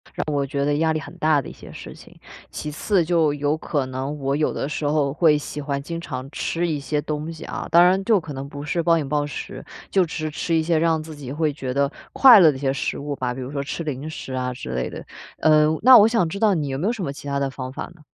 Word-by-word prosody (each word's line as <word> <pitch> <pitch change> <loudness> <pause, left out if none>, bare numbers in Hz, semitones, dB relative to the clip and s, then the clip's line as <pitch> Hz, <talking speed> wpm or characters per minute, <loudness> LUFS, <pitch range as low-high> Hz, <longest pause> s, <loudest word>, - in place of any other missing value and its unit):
让 - - -2
我 140 -1 +1
觉 140 +1 -2
得 145 0 +1
压 160 0 +2
力 155 - -1
很 - - -10
大 155 -2 +2
的 - - -9
一 - - -10
些 - - -13
事 - - -9
情。 - - -16 0.3
其 150 - -6
次 180 +4 +1
就 160 -3 +2
有 145 +1 0
可 145 -4 -2
能 135 +3 -4
我 135 +1 -1
有 150 - 0
的 135 - -3
时 150 - -3
候 145 -2 +1
会 155 -2 +4
喜 150 0 -6
欢 140 -1 -3
经 165 +3 -5
常 130 -4 -6
吃 170 +1 -2
一 150 -3 -1
些 145 +1 -2
东 150 +2 -4
西 160 - -9
啊。 - - -5
当 170 +1 +7
然 190 +2 +3
就 220 -4 +4
可 155 -3 -8
能 135 +1 -6
不 145 0 -8
是 170 +3 -1
暴 165 0 +3
饮 145 -3 -2
暴 145 0 0
食， 145 - -7 0.3
就 190 -2 +3
只 160 - -7
是 155 -1 -3
吃 165 +2 -1
一 160 - +2
些 165 -1 +1
让 165 -1 +2
自 155 -1 -9
己 135 -3 -8
会 155 0 0
觉 130 -3 -4
得 140 +1 +1 0.2
快 250 -6 +9
乐 160 -4 +7
的 130 - -7
一 - - -10
些 135 -1 +1
食 130 - -2
物 145 0 -4
吧。 125 -2 -2
比 130 - -7
如 130 +2 -6
说 140 -1 -3
吃 165 +4 -5
零 150 0 -4
食 135 -4 -7
啊 125 0 -2
之 125 - -8
类 60 0 -2
的。 - - -9 0.3
呃， 155 -1 +5
那 255 +2 +9
我 215 +1 +7
想 225 -7 +1
知 200 - -5
道 215 -2 +4
你 155 -5 -1
有 135 - -3
没 180 +8 -1
有 235 - +1
什 210 - -5
么 140 - -2
其 145 - -10
它 140 0 -1
的 135 -1 -1
方 130 -1 -7
法 - - -5
呢？ 160 - -20
150 Hz, 310 characters per minute, -22 LUFS, 140-165 Hz, 0.3 s, 快